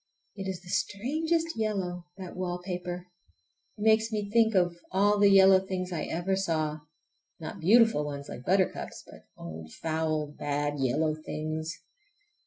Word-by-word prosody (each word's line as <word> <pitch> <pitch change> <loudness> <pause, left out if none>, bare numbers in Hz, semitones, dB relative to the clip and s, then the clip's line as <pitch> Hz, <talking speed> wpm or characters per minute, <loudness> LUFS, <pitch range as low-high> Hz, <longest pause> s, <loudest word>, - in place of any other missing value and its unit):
It 195 -2 -5
is 185 -2 -4
the 180 - -12
strangest 320 - 0
yellow, 190 -5 -2
that 185 -2 -8
wallpaper! 180 0 -4 0.7
It - - -10
makes 220 +1 +4
me 205 -2 -2
think 225 -1 +4
of 175 -2 +3 0.2
all 205 +2 +3
the 200 0 +6
yellow 190 -1 +7
things 185 -1 -4
I 165 - -2
ever 175 +3 -1
saw—not 155 -2 -5
beautiful 225 -2 +5
ones 140 -1 -5
like - - -8
buttercups, 185 +3 0
but - - -15
old 80 -1 -8
foul, 155 -1 -1
bad 145 0 -2
yellow 150 +4 +1
things. 155 +1 -4
180 Hz, 140 wpm, -29 LUFS, 155-200 Hz, 0.7 s, yellow